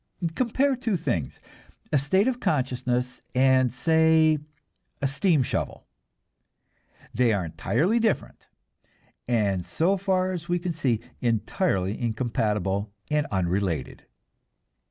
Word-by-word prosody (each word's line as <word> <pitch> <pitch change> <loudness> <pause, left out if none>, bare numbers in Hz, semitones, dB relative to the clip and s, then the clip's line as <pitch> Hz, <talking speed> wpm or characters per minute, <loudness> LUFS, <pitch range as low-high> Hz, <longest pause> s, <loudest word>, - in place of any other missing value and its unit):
Compare 260 +5 +1
the 260 - -1
two 220 -6 0
things, 85 - -2 0.5
a 145 - +5
state 190 +9 +2
of 250 -2 0
consciousness 125 - -1
and 130 -1 +4
say, 160 +3 +3 0.6
a - - -1
steam 145 +1 +2
shovel. - - -3 1.3
They 120 -2 +3
are 95 -4 -1
entirely 160 - 0
different, 225 -1 -1 0.8
and 100 -6 +1
so 180 - +1
far 185 -1 0
as 175 -1 -6
we 175 - +2
can 175 0 -3
see, 125 -8 0 0.2
entirely 110 - 0
incompatible 105 -4 -1 0.2
and 150 -1 +1
unrelated. 90 -5 -2
130 Hz, 115 wpm, -26 LUFS, 110-175 Hz, 1.3 s, a